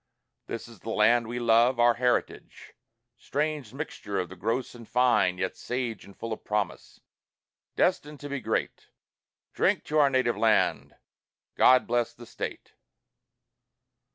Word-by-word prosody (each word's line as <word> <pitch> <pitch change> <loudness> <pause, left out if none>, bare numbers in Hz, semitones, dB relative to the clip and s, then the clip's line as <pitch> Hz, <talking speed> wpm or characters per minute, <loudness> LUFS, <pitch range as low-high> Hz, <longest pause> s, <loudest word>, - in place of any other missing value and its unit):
This 115 - -6
is 115 -4 -14
the 115 - -8
Land 115 +2 +3
we 120 +1 -4
love, 120 +1 +3
our 120 0 +5
heritage, 125 +1 -2 0.5
Strange 150 -4 -2
mixture 125 -7 -5
of 90 -3 -2
the 95 - -10
gross 115 +8 -2
and 115 -2 -13
fine, 125 -7 +3
yet 95 +1 -2
sage 125 -2 -4
And 100 - -16
full 115 -1 -4
of - - -9
promise, 105 -3 -3 0.7
destined 150 0 0
to 145 - -7
be 140 0 -3
great. 110 -2 -3 0.7
Drink - - +1
to 155 0 0
Our 145 -2 +5
Native 130 -3 +1
Land! 110 -1 +1 0.6
God 130 0 +5
Bless 120 0 -1
the 120 - -12
State! - - -7
120 Hz, 145 wpm, -27 LUFS, 110-130 Hz, 0.7 s, our